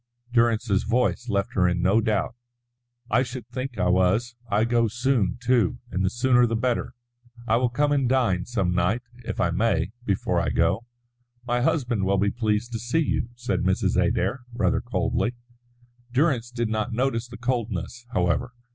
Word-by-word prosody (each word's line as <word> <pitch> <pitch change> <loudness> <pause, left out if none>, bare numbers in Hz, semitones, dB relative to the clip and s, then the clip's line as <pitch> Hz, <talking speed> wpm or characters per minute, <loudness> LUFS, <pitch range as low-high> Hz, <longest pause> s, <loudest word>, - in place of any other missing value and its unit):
Durrance's 115 -4 +2
voice 120 +1 0
left 100 -1 -1
her 90 -2 +3
in 90 0 0
no 100 +5 +4
doubt. 110 -2 0 0.8
"I 120 +4 +4
should 125 -2 -5
think 130 -2 -5
I 90 - +1
was. 95 +7 +2
I 105 +2 +2
go 115 0 +2
soon, 120 -4 0
too, 120 -6 +2
and 95 - -1
the 95 - +2
sooner 125 +1 +3
the 115 - -1
better. 120 +1 -1 0.5
I 115 0 +3
will 125 0 +2
come 145 +4 +1
and 135 -4 +2
dine 115 -9 +2
some 100 -7 0
night, 90 +8 +1 0.2
if - - -4
I 90 -6 +2
may, 90 -2 +1
before 100 -5 0
I - - 0
go." 115 +5 +1 0.6
"My 120 0 0
husband 120 -6 +1
will 100 +1 +2
be 100 +1 +2
pleased 110 +1 -1
to 115 - -3
see 120 +7 -1
you," - - -1
said 120 -7 -2
Mrs. 95 0 +1
Adair, 100 +9 +1
rather 120 - +1
coldly. 120 +1 -1 0.8
Durrance 130 -3 +1
did 120 -2 -2
not 110 0 -1
notice 120 0 0
the 120 - -10
coldness, 120 -1 -3
however. 90 +6 0
115 Hz, 175 wpm, -25 LUFS, 100-125 Hz, 0.8 s, no